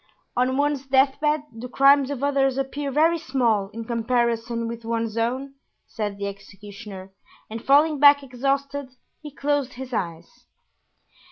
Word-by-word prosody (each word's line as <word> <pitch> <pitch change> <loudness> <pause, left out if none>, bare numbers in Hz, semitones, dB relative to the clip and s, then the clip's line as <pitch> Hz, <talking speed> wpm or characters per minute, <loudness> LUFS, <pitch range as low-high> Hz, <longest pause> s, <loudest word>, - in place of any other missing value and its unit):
"On 255 +2 +1
one's 285 -1 0
death 270 +1 +3
bed 300 0 +1
the 235 +3 -8
crimes 275 +1 +4
of 280 -2 -4
others 270 -2 +1
appear 275 +1 -3
very 325 +4 +3
small 235 -9 0
in 230 +2 -7
comparison 235 0 -1
with 235 0 -6
one's 230 -1 -2
own," 255 +4 -2 0.3
said 210 -3 -4
the 200 - -4
executioner; 200 0 -9 0.4
and 225 +1 -6
falling 295 +2 +4
back 285 0 +7
exhausted 275 +2 -2 0.3
he 300 - -8
closed 285 -2 -1
his 255 0 -8
eyes. 175 - -5
260 Hz, 145 wpm, -24 LUFS, 230-280 Hz, 0.4 s, back